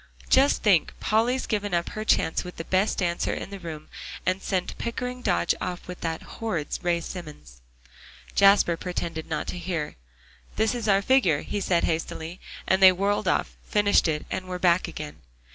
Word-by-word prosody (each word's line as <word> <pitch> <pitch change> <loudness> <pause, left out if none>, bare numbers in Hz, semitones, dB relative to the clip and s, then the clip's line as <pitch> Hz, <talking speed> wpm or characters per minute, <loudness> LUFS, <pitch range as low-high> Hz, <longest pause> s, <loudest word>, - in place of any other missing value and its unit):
"Just 275 +2 +4
think, 195 -8 +3
Polly's 235 +4 +1
given 205 -4 -1
up 170 0 -1
her 215 -2 -5
chance 160 -6 +2
with 180 - -9
the 165 - -4
best 190 +5 +1
dancer 175 -2 0
in - - -6
the 200 - -7
room, 155 -3 -7 0.4
and 185 +1 0
sent 185 -2 -2
Pickering 250 +2 -4
Dodge 85 - +2
off 180 0 -4
with 180 0 -8
that 160 -1 -3
horrid 180 -10 -4
Ray 175 -1 +1
Simmons." 150 - -9 0.7
Jasper 195 -4 +5
pretended 170 -3 -4
not 155 - -2
to 180 - -5
hear. 170 - -3 0.6
"This 220 +2 +2
is 240 -2 -3
our 195 -1 +4
figure," 195 - +3
he 205 - -3
said 175 -3 +1
hastily, 165 +1 -3 0.3
and 190 +1 +2
they 190 -1 +10
whirled 200 +2 0
off, - - 0
finished 205 -3 +3
it, 150 -1 -1
and 185 0 -3
were 180 0 -3
back 180 0 +3
again. 155 -3 -7
185 Hz, 180 wpm, -26 LUFS, 165-205 Hz, 0.7 s, they